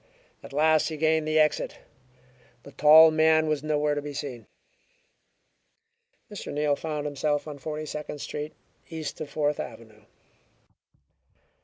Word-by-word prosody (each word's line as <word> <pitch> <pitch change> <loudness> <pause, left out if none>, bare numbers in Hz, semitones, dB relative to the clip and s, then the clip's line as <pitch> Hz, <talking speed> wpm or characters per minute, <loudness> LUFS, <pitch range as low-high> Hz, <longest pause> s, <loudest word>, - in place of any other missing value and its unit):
At - - -12
last 155 +2 +3
he 155 - -5
gained 160 0 +1
the 155 0 +1
exit. 150 -1 +1 0.9
The 140 - -12
tall 155 +2 +7
man 160 0 +3
was 155 -2 0
nowhere 150 -1 0
to 145 - -2
be 145 0 -7
seen. 130 -6 -6 1.8
Mr. 205 - -7
Neal 145 0 +1
found 150 -1 -4
himself 145 +1 -1
on 145 -2 -8
Forty 155 +2 -5
Second 150 0 -6
Street, 150 +2 -6 0.3
east 160 -2 -6
of 150 - -5
Fourth 150 -1 -1
Avenue. 110 -3 -9
150 Hz, 135 wpm, -26 LUFS, 145-155 Hz, 1.8 s, tall